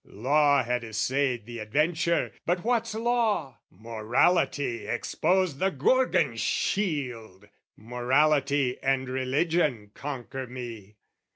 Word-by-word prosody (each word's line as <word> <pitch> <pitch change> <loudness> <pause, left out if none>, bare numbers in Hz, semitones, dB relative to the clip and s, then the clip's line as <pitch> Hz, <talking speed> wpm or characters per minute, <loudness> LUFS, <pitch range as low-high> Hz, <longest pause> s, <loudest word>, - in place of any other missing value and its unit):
Law 140 +5 +2
had 120 0 -1
essayed 120 +2 -1
the 120 0 -8
adventure, 160 +9 0 0.2
but 175 +1 0
what's 230 -1 0
Law? 225 - 0
Morality 115 - 0
exposed 180 +5 0
the 190 - +2
Gorgon 255 - +2
shield! 125 - -2 0.3
Morality 135 +3 +1
and 135 -1 0
Religion 130 -3 0
conquer 135 -2 -6
me. 115 -5 -8
135 Hz, 95 wpm, -27 LUFS, 120-165 Hz, 0.3 s, Law